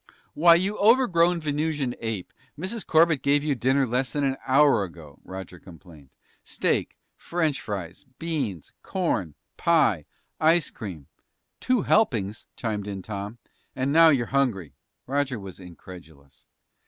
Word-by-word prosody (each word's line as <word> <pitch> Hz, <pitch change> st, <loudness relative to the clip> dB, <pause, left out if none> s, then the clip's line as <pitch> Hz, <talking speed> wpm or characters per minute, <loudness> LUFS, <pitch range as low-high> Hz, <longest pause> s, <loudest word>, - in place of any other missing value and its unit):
"Why, 170 Hz, +2 st, +6 dB
you 195 Hz, +5 st, -1 dB
overgrown 180 Hz, -7 st, +4 dB
Venusian 150 Hz, -3 st, -1 dB
ape, 110 Hz, -5 st, -4 dB, 0.2 s
Mrs. 195 Hz, +7 st, -4 dB
Corbett 160 Hz, -2 st, +3 dB
gave 145 Hz, +1 st, +2 dB
you 150 Hz, -1 st, +1 dB
dinner 130 Hz, +2 st, +1 dB
less 125 Hz, +2 st, -1 dB
than 145 Hz, -, -1 dB
an 135 Hz, -1 st, +1 dB
hour 140 Hz, -4 st, +4 dB
ago!" 80 Hz, -5 st, -11 dB
Roger 95 Hz, -2 st, -9 dB
complained. 85 Hz, -6 st, -15 dB, 0.3 s
"Steak, -, -, -1 dB, 0.2 s
French 155 Hz, -5 st, -2 dB
fries, 95 Hz, -5 st, -6 dB
beans, 140 Hz, -, -4 dB
corn, 130 Hz, -, -2 dB, 0.2 s
pie, 150 Hz, -, +2 dB, 0.3 s
ice 165 Hz, +1 st, +3 dB
cream...." 90 Hz, -, -8 dB, 0.5 s
"Two 255 Hz, -4 st, +1 dB
helpings," 115 Hz, -, +1 dB
chimed 105 Hz, -3 st, -3 dB
in 100 Hz, -2 st, -6 dB
Tom. 105 Hz, +2 st, -6 dB, 0.4 s
"And 135 Hz, +2 st, -1 dB
now 165 Hz, 0 st, +7 dB
you're 130 Hz, -6 st, +2 dB
hungry!" 105 Hz, -, 0 dB, 0.3 s
Roger 135 Hz, -3 st, -1 dB
was 95 Hz, -2 st, -10 dB
incredulous. 80 Hz, -6 st, -14 dB
130 Hz, 130 wpm, -25 LUFS, 95-160 Hz, 0.5 s, now